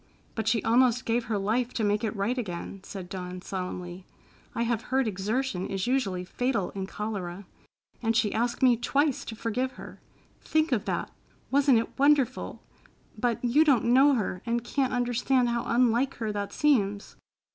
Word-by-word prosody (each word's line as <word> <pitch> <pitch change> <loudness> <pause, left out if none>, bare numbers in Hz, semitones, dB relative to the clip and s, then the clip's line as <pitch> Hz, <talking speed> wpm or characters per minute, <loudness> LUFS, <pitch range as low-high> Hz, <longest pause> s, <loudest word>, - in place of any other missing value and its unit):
"But 220 -1 -3
she 225 -2 +2
almost 245 +1 +3
gave 230 +1 0
her 220 -2 -1
life 230 +5 0
to 225 - 0
make 205 +1 +1
it 220 0 -2
right 205 +5 0
again," 195 -4 -5
said 190 -1 -8
Dawn 180 0 -6
solemnly. 180 -1 -6 0.5
"I 235 - 0
have 235 -1 -1
heard 265 -1 +2
exertion 210 +1 -2
is 195 -1 -2
usually 210 -8 0
fatal 240 -1 -1
in 190 -1 -5
cholera. 200 -3 -5 0.6
And 225 -1 +1
she 215 -2 +2
asked 240 +3 -1
me 245 -2 +6
twice 275 +3 +1
to 225 - -6
forgive 250 +4 -2
her. - - -11 0.4
Think 315 -1 +1
of 230 -6 +1
that! - - -2 0.4
Wasn't 275 -2 +5
it 225 +4 -3
wonderful? 285 -2 +2 0.5
But 235 +2 -1
you 270 +6 +5
don't 250 -5 +3
know 275 +2 +6
her 190 -5 -2
and 235 0 -1
can't 265 +2 0
understand 245 +1 +1
how 235 0 -1
unlike 245 +2 +2
her 220 -3 -3
that 205 -1 -3
seems." 205 -9 +1
230 Hz, 170 wpm, -27 LUFS, 200-255 Hz, 0.6 s, me